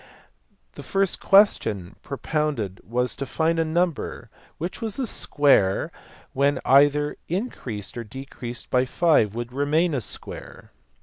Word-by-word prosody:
The -, -, -9 dB
first 195 Hz, -1 st, 0 dB
question 110 Hz, -, +3 dB
propounded 140 Hz, -, -2 dB
was 125 Hz, +2 st, -1 dB
to 140 Hz, -, -3 dB
find 165 Hz, +3 st, 0 dB
a -, -, +3 dB
number 170 Hz, 0 st, -1 dB
of -, -, -16 dB, 0.3 s
which 170 Hz, +4 st, -5 dB
the 225 Hz, +4 st, -2 dB
square 140 Hz, -, +2 dB, 0.4 s
when 140 Hz, 0 st, +2 dB
either 145 Hz, +2 st, +4 dB
increased 135 Hz, -, -4 dB
or 120 Hz, -, -4 dB
decreased 125 Hz, 0 st, -8 dB
by 125 Hz, 0 st, +3 dB
5 130 Hz, -, +2 dB
would 120 Hz, +1 st, -5 dB
remain 150 Hz, +5 st, +1 dB
a 135 Hz, -, 0 dB
square. -, -, -8 dB
140 Hz, 130 wpm, -24 LUFS, 120-165 Hz, 0.4 s, either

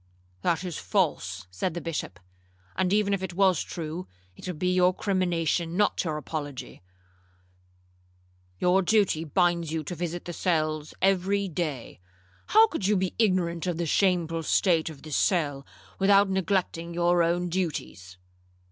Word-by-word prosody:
'—'That 170 Hz, -, 0 dB
is 180 Hz, -4 st, -4 dB
false,' 95 Hz, -, -1 dB
said 160 Hz, -, -3 dB
the -, -, -2 dB
Bishop; 160 Hz, -, -5 dB, 0.6 s
'and 185 Hz, 0 st, 0 dB
even 205 Hz, -1 st, +2 dB
if 195 Hz, -, -1 dB
it 185 Hz, -2 st, -5 dB
was 190 Hz, -4 st, +3 dB
true, 165 Hz, +2 st, -5 dB, 0.3 s
it -, -, -10 dB
would 180 Hz, -4 st, -4 dB
be 180 Hz, +3 st, +1 dB
your 180 Hz, 0 st, +3 dB
crimination, 175 Hz, -4 st, 0 dB
not 205 Hz, 0 st, +2 dB
your 155 Hz, -4 st, -2 dB
apology. 145 Hz, -, -6 dB, 1.8 s
Your 180 Hz, -, +3 dB
duty 195 Hz, -5 st, +2 dB
binds 170 Hz, 0 st, +1 dB
you 160 Hz, -1 st, -2 dB
to 165 Hz, -, -5 dB
visit 175 Hz, 0 st, -4 dB
the 175 Hz, -, -5 dB
cells 155 Hz, -4 st, -1 dB
every 195 Hz, +1 st, +2 dB
day; 155 Hz, -, -4 dB, 0.5 s
how 440 Hz, +1 st, +7 dB
could 320 Hz, -, -3 dB
you 210 Hz, -1 st, +3 dB
be 185 Hz, -1 st, -1 dB
ignorant 185 Hz, -5 st, +1 dB
of 175 Hz, -2 st, -1 dB
the 170 Hz, -, -1 dB
shameful 165 Hz, -1 st, +1 dB
state 165 Hz, 0 st, +2 dB
of 150 Hz, -4 st, -12 dB
this 155 Hz, -2 st, -4 dB
cell, 145 Hz, -8 st, 0 dB, 0.3 s
without 195 Hz, 0 st, +5 dB
neglecting 180 Hz, -3 st, -1 dB
your 175 Hz, 0 st, +3 dB
own 175 Hz, +1 st, +1 dB
duties?' 155 Hz, -, -4 dB
175 Hz, 150 wpm, -27 LUFS, 160-190 Hz, 1.8 s, how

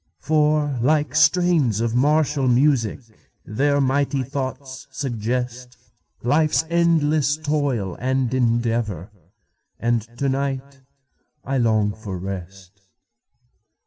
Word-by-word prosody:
For, 150 Hz, -3 st, +1 dB
like 145 Hz, +1 st, +1 dB
strains 155 Hz, -, +3 dB
of 115 Hz, 0 st, -1 dB
martial 145 Hz, +1 st, +2 dB
music, 125 Hz, -3 st, +2 dB, 0.4 s
Their 140 Hz, +6 st, +1 dB
mighty 140 Hz, 0 st, +1 dB
thoughts 130 Hz, 0 st, -6 dB
suggestLife's 125 Hz, +4 st, -2 dB
endless 155 Hz, -3 st, +2 dB
toil 145 Hz, -, -1 dB
and 130 Hz, 0 st, 0 dB
endeavor; 115 Hz, -6 st, 0 dB, 0.7 s
And 120 Hz, 0 st, +1 dB, 0.2 s
to 140 Hz, -, -1 dB
night 135 Hz, 0 st, -3 dB, 0.6 s
I 135 Hz, 0 st, -1 dB
long 110 Hz, -3 st, +2 dB
for 105 Hz, -3 st, -7 dB
rest. 95 Hz, +1 st, -8 dB
130 Hz, 90 wpm, -22 LUFS, 115-145 Hz, 0.7 s, strains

